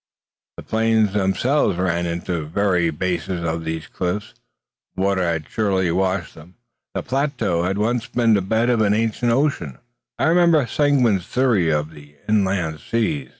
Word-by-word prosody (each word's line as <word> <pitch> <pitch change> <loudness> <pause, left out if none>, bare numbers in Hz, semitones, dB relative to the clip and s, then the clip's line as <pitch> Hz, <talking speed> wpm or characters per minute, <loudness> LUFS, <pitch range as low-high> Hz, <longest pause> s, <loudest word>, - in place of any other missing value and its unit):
The - - -8
plains 110 -2 +1
themselves 105 +4 +1
ran 85 -1 0
into 85 +1 -3
the 80 -3 -2
very 90 0 +1
bases 90 +2 -3
of 80 0 -2
these, 80 -1 -4
cliffs. 100 +5 -4 0.6
Water 95 0 +1
had 85 -4 -1
surely 95 -5 0
washed 95 -1 -1
them. 80 +3 -15 0.4
These - - -2
plateaux 125 - 0
had 95 +3 -1
once 115 +2 0
been 115 -2 +2
the 100 - +3
bed 110 +5 +1
of 115 -2 +2
an 105 -1 +3
ancient 115 +2 0
ocean. 115 - 0 0.4
I - - -2
remembered 165 -6 +4
Seguin's 125 - +2
theory 120 -10 +2
of 75 0 -1
the 75 -1 -15
inland 95 -7 0
seas. 75 - -2
95 Hz, 155 wpm, -21 LUFS, 85-115 Hz, 0.6 s, remembered